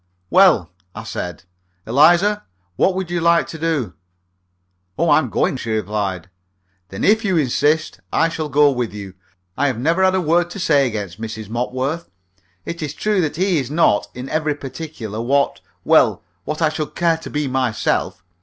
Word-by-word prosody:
"Well," 160 - +5 0.2
I - - -6
said, 90 -2 -6 0.4
"Eliza, 175 - +4 0.3
what 185 - +2
would 185 -2 -3
you 175 -1 -1
like 170 0 +4
to 160 - -8
do?" 150 - -1 1.0
"Oh, - - +2
I'm - - +3
going!" - - 0
she 115 - -6
replied. 100 -4 -2 0.6
"Then 95 - -6
if 220 +2 +4
you 190 -5 +1
insist, 150 +2 +1
I 165 - +3
shall 160 -2 -4
go 145 0 +4
with 120 -5 -3
you. 100 -2 -8 0.4
I've 135 -3 0
never 165 +9 +1
had 190 0 +4
a - - +2
word 175 +1 +2
to 200 - -8
say 145 -6 +3
against 105 -4 -5
Mrs. 110 -2 -6
Mopworth. 130 +7 -3 0.6
It 170 0 -5
is 150 -1 -4
true 210 -3 +1
that 155 -3 -2
he 185 -1 +1
is 130 -2 -4
not 150 -9 +2
in 125 +2 -6
every 155 0 -1
particular 135 -7 -7
what 140 +4 +1 0.2
well, - - +3 0.2
what 155 +2 -2
I 155 - +4
should 150 -1 -5
care 170 -1 +2
to 165 - -9
be 150 -1 -2
myself. 130 -9 -1
150 Hz, 175 wpm, -20 LUFS, 120-170 Hz, 1.0 s, Well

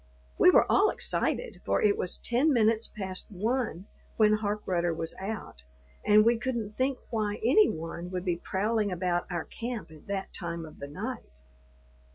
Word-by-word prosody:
We - - +8
were - - +6
all - - +4
excited, - - -1
for 100 - +1
it 205 -1 +3
was 180 - -2
ten 260 +6 +2
minutes 225 -3 +3
past 190 -3 -6
one 215 -2 -2 0.3
when 215 -1 +5
Harkrudder 185 -5 -1
was 165 0 -4
out, 195 - -6 0.4
and 210 +1 +6
we 235 0 +4
couldn't 235 -4 -2
think 260 +4 0
why 215 -3 0
any 360 - +5
one 165 +2 -5
would 180 0 -4
be 175 -2 0
prowling 210 +3 0
about 175 -1 -1
our 170 -2 -2
camp 235 -7 -6
at 155 -1 -15
that 195 -1 -4
time 170 -2 -4
of 155 - -13
the 140 - -6
night. 185 - -7
205 Hz, 170 wpm, -29 LUFS, 175-225 Hz, 0.4 s, We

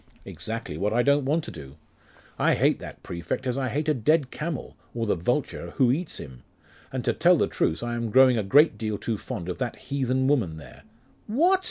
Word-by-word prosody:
'Exactly 110 -8 -5
what 105 +3 0
I 120 +1 +3
don't 140 0 +3
want 155 +4 +1
to - - -6
do. 70 -5 -10 0.6
I - - +3
hate - - +2
that - - -10
prefect 85 +9 -4
as 125 -2 0
I 135 -2 -1
hate 150 +4 -2
a 155 - +4
dead 145 +2 +2
camel, 155 -3 -5 0.2
or 115 -1 -1
the 105 - +2
vulture 125 - -2
who 130 -3 +4
eats 160 +5 -2
him. 65 -3 -10 0.5
And - - -4
to - - +2
tell - - +5
the - - +2
truth, 80 - -1
I 120 0 -2
am 115 -1 -2
growing 130 +2 +6
a 110 - +1
great 130 +3 +4
deal 110 -2 -2
too 110 -1 -3
fond 105 -10 -6
of 90 - -4
that 125 -3 -2
heathen 130 -1 -1
woman 110 - +1
there 70 -3 -13 0.3
' - - -34
'What? 340 - +3
120 Hz, 220 wpm, -26 LUFS, 105-140 Hz, 0.6 s, growing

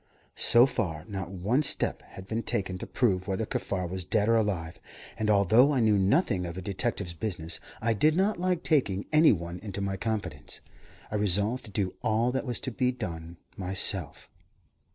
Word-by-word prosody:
So 120 +1 +6
far, 90 - -3
not 95 -4 -5
one 100 +9 0
step 150 - 0
had 95 - -12
been 115 +2 -2
taken 95 -4 -3
to - - -6
prove 95 -7 0
whether 100 +3 -1
Kaffar 95 -3 -3
was 95 +1 -3
dead 105 +4 +1
or 115 - +5
alive, 95 -7 -1 0.4
and 110 -1 -1
although 110 +7 +5
I 135 - +1
knew 110 -3 +4
nothing 95 - +2
of 85 +1 -7
a - - -4
detective's 100 -2 -2
business, 85 -3 -4 0.2
I 115 0 +2
did 150 +9 +3
not 195 +1 +1
like 180 -1 0
taking 105 - +1
any 155 +1 +7
one 85 -2 -3
into 100 -1 -6
my 100 -1 -2
confidence. 90 -9 -4 0.5
I 105 - 0
resolved 105 +5 +1
to - - -8
do 95 -2 -1
all 115 +1 +1
that 130 +1 -3
was 120 - 0
to 130 - -4
be 125 +1 +1
done 85 -8 -6 0.2
myself. 95 -3 -1
100 Hz, 185 wpm, -28 LUFS, 90-120 Hz, 0.5 s, any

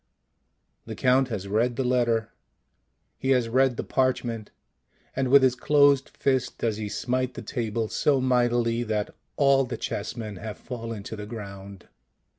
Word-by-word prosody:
The - - -5
Count 130 +1 +3
has 105 -5 -4
read 115 +4 +1
the 135 - -1
letter, 120 -3 +1 0.9
he 130 - -2
has 120 -2 -1
read 130 +1 +2
the - - -2
parchment, 120 -4 -1 0.7
and 135 0 0
with 135 +1 +6
his 130 -2 +4
closed 140 +1 +3
fist 130 -2 -1
does 110 -3 -1
he 105 -1 -4
smite 130 +3 -2
the 120 - -7
table 110 0 -2
so 140 +4 +2
mightily 120 -2 +2
that 110 -3 -2 0.2
all 140 -1 +4
the 125 - -5
chessmen 110 -4 -5
have 110 +3 -7
fallen 115 -4 -6
to 110 - -6
the 105 -1 -7
ground. 100 -3 -9
120 Hz, 155 wpm, -26 LUFS, 110-130 Hz, 0.9 s, with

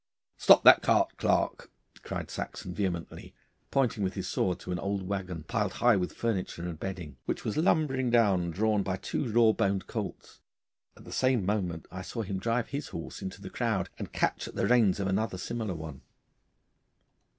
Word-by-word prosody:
'Stop - - +6
that - - +9
cart, - - +2
Clarke,' - - 0 0.3
cried - - -5
Saxon 90 - -5
vehemently, 90 -4 -4 0.3
pointing 125 -6 +1
with 95 - -1
his 95 -2 -3
sword 90 -2 0
to 90 - -6
an 90 - -1
old 100 0 -2
waggon, 95 -5 -3
piled 105 +1 -1
high 120 -2 +4
with 90 -2 -1
furniture 95 -6 -2
and 80 -3 -6
bedding, 90 -8 -6
which - - -3
was 110 - -1
lumbering 150 -6 +2
along 95 -7 +3
drawn 105 +4 +1
by 95 -1 -1
two 115 +5 -3
raw 115 0 +6
boned 100 -3 0
colts. - - -6 0.6
At - - -14
the - - -11
same 130 -6 +2
moment 90 -5 -1
I 95 - -6
saw 115 +4 -4
him 95 -1 -3
drive 115 +3 0
his 140 +2 -4
horse 85 - -7
into 95 +1 -6
the 95 - -7
crowd 110 -6 -1
and - - -6
catch - - 0
at - - -10
the - - +1
reins 115 -6 +4
of 100 - -1
another 95 +1 0
similar 110 -1 -3
one. 80 -4 -8
100 Hz, 185 wpm, -29 LUFS, 90-115 Hz, 0.6 s, that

